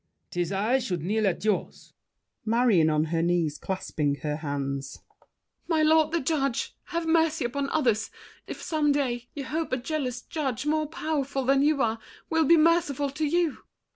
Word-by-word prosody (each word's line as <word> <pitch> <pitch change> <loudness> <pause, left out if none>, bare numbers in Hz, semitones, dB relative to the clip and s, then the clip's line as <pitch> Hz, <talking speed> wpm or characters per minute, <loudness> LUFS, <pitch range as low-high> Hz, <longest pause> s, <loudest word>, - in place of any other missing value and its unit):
'Tis 175 +1 -2
I 215 +7 +2
should 180 - -3
kneel 210 +3 +1
at 190 +2 -2
yours. 210 -3 -2 0.5
MARION 220 -8 +3
(on 155 0 +2
her 165 - +2
knees, 170 -3 0
clasping 155 -6 -2
her 150 -1 -1
hands). 140 -3 -4 0.6
My 320 -2 +2
lord 315 0 +4
the 335 - +1
judge, 275 -4 -1
Have 335 -2 -3
mercy 320 -3 +2
upon 275 +3 -2
others, 235 -8 +1 0.4
if - - -7
some 305 -2 +1
day 245 -4 -1
You 280 -2 -5
hope 315 +4 -3
a 255 - +1
jealous 255 -2 -3
judge, 275 -6 -3
more 310 0 +1
powerful 285 -4 -2
Than 270 +1 +4
you 290 -1 +3
are, 225 0 0 0.3
will 320 -1 +3
be 335 +4 +6
merciful 310 -4 +2
to 305 +2 -1
you! 335 -1 +1
265 Hz, 170 wpm, -27 LUFS, 200-310 Hz, 0.6 s, be